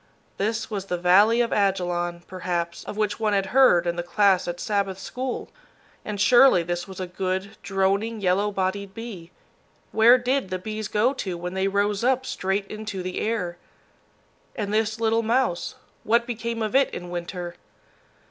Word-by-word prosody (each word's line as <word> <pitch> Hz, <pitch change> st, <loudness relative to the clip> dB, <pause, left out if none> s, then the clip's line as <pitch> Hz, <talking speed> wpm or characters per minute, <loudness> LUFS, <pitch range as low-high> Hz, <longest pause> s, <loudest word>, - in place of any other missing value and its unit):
This 220 Hz, +3 st, -2 dB
was 200 Hz, -2 st, -3 dB
the 180 Hz, -, -1 dB
valley 200 Hz, +7 st, +5 dB
of 235 Hz, -, 0 dB
Ajalon, 175 Hz, -3 st, 0 dB
perhaps, 175 Hz, -2 st, -3 dB
of 210 Hz, -, -7 dB
which 210 Hz, 0 st, -1 dB
one 215 Hz, -2 st, +1 dB
had 195 Hz, -1 st, +2 dB
heard 250 Hz, -10 st, +6 dB
in 170 Hz, 0 st, -1 dB
the -, -, 0 dB
class 190 Hz, +1 st, +2 dB
at 175 Hz, 0 st, -4 dB
Sabbath 200 Hz, -2 st, -1 dB
school. 250 Hz, +6 st, -5 dB, 0.5 s
And 210 Hz, -1 st, -5 dB
surely 240 Hz, -4 st, +6 dB
this 175 Hz, +2 st, -3 dB
was 190 Hz, -1 st, -9 dB
a 185 Hz, -, -2 dB
good, 185 Hz, +2 st, -3 dB
droning, 200 Hz, +3 st, 0 dB
yellow 195 Hz, +2 st, +2 dB
bodied 195 Hz, +1 st, -2 dB
bee 215 Hz, -8 st, -8 dB, 0.6 s
where 230 Hz, +3 st, +6 dB
did 255 Hz, -3 st, -1 dB
the 185 Hz, -, -2 dB
bees 215 Hz, +2 st, -5 dB
go 225 Hz, +7 st, +2 dB
to 185 Hz, -9 st, -4 dB
when 180 Hz, +1 st, -5 dB
they 190 Hz, +1 st, 0 dB
rose 200 Hz, +1 st, 0 dB
up 260 Hz, +1 st, +2 dB
straight 195 Hz, -2 st, -1 dB
into 205 Hz, -2 st, -6 dB
the 185 Hz, 0 st, -4 dB
air? 185 Hz, -6 st, -2 dB, 1.0 s
And 210 Hz, -3 st, -3 dB
this 220 Hz, +1 st, 0 dB
little 225 Hz, 0 st, +2 dB
mouse, 230 Hz, -5 st, 0 dB, 0.3 s
what 235 Hz, +2 st, +2 dB
became 230 Hz, -1 st, -3 dB
of 215 Hz, -, -2 dB
it 270 Hz, +1 st, +4 dB
in 175 Hz, 0 st, -7 dB
winter? 175 Hz, 0 st, -5 dB
200 Hz, 170 wpm, -24 LUFS, 180-225 Hz, 1.0 s, heard